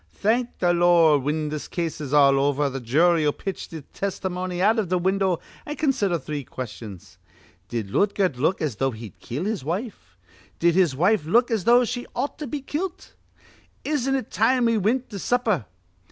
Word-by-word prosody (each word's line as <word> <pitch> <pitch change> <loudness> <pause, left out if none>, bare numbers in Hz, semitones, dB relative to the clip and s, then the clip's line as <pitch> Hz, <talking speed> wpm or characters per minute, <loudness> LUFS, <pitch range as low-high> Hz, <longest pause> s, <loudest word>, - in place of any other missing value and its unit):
Thank 235 +4 0
th' - - -9
Lord, 170 -4 +5
whin 150 +2 -2
th' 150 -1 -5
case 165 -3 -3
is 140 -3 -5
all 140 -2 +5
over, 140 0 +1
the 135 - -4
jury'll 155 +5 +3
pitch 195 +5 -6
th' 160 -3 -8
tistimony 185 -2 -3
out 215 +5 +3
iv 200 -6 -2
th' 180 0 +1
window, 190 -1 +1 0.2
an' 295 - -5
consider 210 - +1
three 150 -1 -5
questions: 105 -7 -9 0.5
'Did 110 -5 -4
Lootgert 195 - +1
look 160 +8 0
as 135 -9 -2
though 135 +2 +1
he'd 110 -5 -10
kill 140 +10 -4
his 215 -7 -2
wife? 165 - -5 0.4
Did 170 0 +3
his 175 -6 +3
wife 180 +3 +2
look 235 +7 +3
as 220 -5 0
though 245 +1 +5
she 245 +1 -4
ought 285 - -3
to 300 - -4
be 285 +3 -4
kilt? 335 +7 -5 0.7
Isn't 270 -3 0
it 260 -5 -4
time 245 +3 +2
we 230 0 +3
wint 235 +6 0
to 200 - -5
supper?' 220 - 0
175 Hz, 180 wpm, -24 LUFS, 145-225 Hz, 0.7 s, Lord